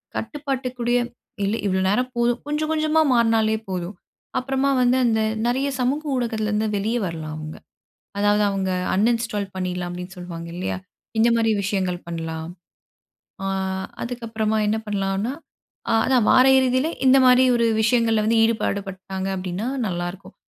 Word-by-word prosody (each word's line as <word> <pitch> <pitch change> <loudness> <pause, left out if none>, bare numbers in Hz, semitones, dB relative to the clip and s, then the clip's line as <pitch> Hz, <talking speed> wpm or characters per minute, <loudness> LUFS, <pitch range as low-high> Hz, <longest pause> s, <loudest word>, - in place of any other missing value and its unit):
கட்டுப்பாட்டுக்குடைய 255 -4 -2 0.5
இல்ல 200 +3 0
இவ்ளோ 190 -1 +1
நேரம் 250 +6 +1
போதும், 240 0 +1
கொஞ்சம் 300 +1 -1
கொஞ்சமா 310 0 +2
மாறினாலே 225 -2 +3
போதும். 180 +1 -4 0.4
அப்புறமா 270 +1 0
வந்து 250 +1 +3
அந்த 225 -2 +2 0.3
நெறைய 260 +3 +1
சமூக 265 +5 0
ஊடகத்துலருந்து 220 -3 -1
வெளியே 220 +4 0
வரலாம் 160 -3 -5
அவங்க. 155 0 -7 0.6
அதாவது 205 +1 +3
அவங்க 195 -1 -1 0.3
அன்இன்ஸ்டால் 215 -2 0
பண்ணிடலாம், 180 -1 -3
அப்டின்னு 180 +2 -7
சொல்லுவாங்க 170 -2 -7
இல்லையா? 185 +1 -3 0.4
இந்த 230 +2 +5
மாரி 225 -1 +2
விஷயங்கள் 190 -3 -1
பண்ணலாம். 165 -1 -5 1.0
ஆ - - -1 0.6
அதுக்கப்புறமா 225 -3 -2
என்ன 215 - +1
பண்ணலான்னா, 200 +3 -1 0.7
அதான் 255 -4 +3
வார 255 0 +6
இறுதியில, 260 +3 +2 0.2
இந்த 260 +1 +7
மாரி 250 0 +6
ஒரு 235 -1 +2 0.2
விஷயங்கள்ல 225 -1 +3
வந்து 225 0 +3
ஈடுபாடுபட்டாங்க 195 -4 -2
அப்டின்னா 185 +3 -4 0.2
நல்லாருக்கும். 175 0 -5
220 Hz, 130 wpm, -23 LUFS, 190-245 Hz, 1.0 s, இந்த